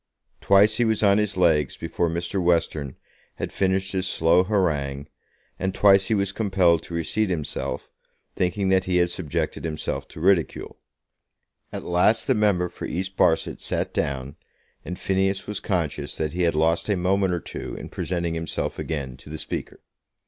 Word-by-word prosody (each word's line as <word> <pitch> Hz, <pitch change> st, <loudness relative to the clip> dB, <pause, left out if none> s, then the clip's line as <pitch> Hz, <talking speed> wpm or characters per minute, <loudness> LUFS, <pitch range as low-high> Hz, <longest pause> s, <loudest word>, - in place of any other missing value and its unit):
Twice 105 Hz, +2 st, +4 dB
he 120 Hz, -, +3 dB
was 110 Hz, -2 st, +1 dB
on 100 Hz, 0 st, +5 dB
his 105 Hz, -2 st, -1 dB
legs 80 Hz, -6 st, +2 dB
before 85 Hz, +1 st, -1 dB
Mr. 85 Hz, +3 st, -2 dB
Western 80 Hz, -5 st, +1 dB, 0.4 s
had -, -, -5 dB
finished 95 Hz, 0 st, 0 dB
his 95 Hz, -1 st, -1 dB
slow 85 Hz, +3 st, +4 dB
harangue, 75 Hz, -8 st, 0 dB, 0.5 s
and 95 Hz, 0 st, -2 dB
twice 95 Hz, -2 st, +5 dB
he 110 Hz, -, +2 dB
was 100 Hz, -2 st, 0 dB
compelled 95 Hz, -6 st, +2 dB
to 85 Hz, -, -7 dB
reseat 100 Hz, +6 st, 0 dB
himself, 75 Hz, -6 st, -3 dB, 0.5 s
thinking 95 Hz, +2 st, 0 dB
that 95 Hz, 0 st, +3 dB
he 90 Hz, -1 st, +1 dB
had 85 Hz, 0 st, +2 dB
subjected 80 Hz, -7 st, -3 dB
himself 80 Hz, -2 st, -3 dB
to -, -, -11 dB
ridicule. 90 Hz, -1 st, +1 dB, 0.9 s
At -, -, -5 dB
last 90 Hz, +6 st, +3 dB
the 130 Hz, -, +3 dB
member 100 Hz, -5 st, +2 dB
for -, -, -8 dB
East 95 Hz, +2 st, -3 dB
Barset 85 Hz, -3 st, +2 dB
sat -, -, -2 dB
down, 70 Hz, -1 st, -2 dB, 0.5 s
and 90 Hz, +2 st, -6 dB
Phineas 95 Hz, 0 st, 0 dB
was 105 Hz, -1 st, -4 dB
conscious 85 Hz, -7 st, -2 dB
that 80 Hz, -1 st, -2 dB
he 90 Hz, -, -2 dB
had 85 Hz, -2 st, +2 dB
lost 80 Hz, +5 st, +1 dB
a 100 Hz, -, +2 dB
moment 95 Hz, +1 st, +1 dB
or -, -, -2 dB
two -, -, -7 dB
in -, -, -7 dB
presenting 85 Hz, -2 st, -2 dB
himself 80 Hz, -1 st, -3 dB
again 70 Hz, -5 st, -4 dB
to 65 Hz, -, -15 dB
the 80 Hz, -, -5 dB
Speaker. -, -, -6 dB
90 Hz, 170 wpm, -24 LUFS, 80-95 Hz, 0.9 s, on